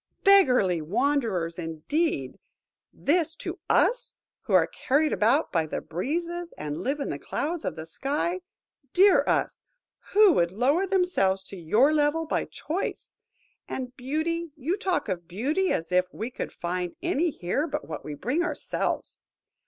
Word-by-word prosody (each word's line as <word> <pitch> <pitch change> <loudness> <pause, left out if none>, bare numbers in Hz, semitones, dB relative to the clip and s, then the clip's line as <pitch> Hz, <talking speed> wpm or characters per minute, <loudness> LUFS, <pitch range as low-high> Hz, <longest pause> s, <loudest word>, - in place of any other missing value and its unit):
Beggarly 250 - +5
wanderers, 190 - 0
indeed! 165 - -2 0.5
This 325 +1 +1
to - - -6
us, - - +2 0.3
who - - -2
are - - +6
carried 295 +3 +1
about 245 +9 +2
by 165 -3 +1
the - - -3
breezes, 340 - -3
and 150 +2 -4
live 275 +8 -1
in 280 - -3
the - - -4
clouds 330 +2 -3
of - - -2
the 160 -1 -7
sky! 295 - -2 0.5
Dear 390 +2 +6
us! - - 0 0.5
Who 420 -1 +7
would 170 - +2
lower 275 - +2
themselves 360 - +2
to - - -8
your 215 - +3
level 305 +2 +2
by - - -1
choice? 340 +6 -4 0.6
And 255 -1 -5
beauty,–you 315 +3 -2
talk 375 -3 -1
of 175 -2 -4
beauty, 290 - 0
as 165 +1 -2
if 180 0 +2
we 230 +4 -5
could - - -5
find 180 0 -3
any 345 -1 +1
here 275 - -2
but 280 - -4
what 155 -1 -6
we 150 - -6
bring 250 - -1
ourselves. 355 - -2
275 Hz, 150 wpm, -27 LUFS, -, 0.6 s, Who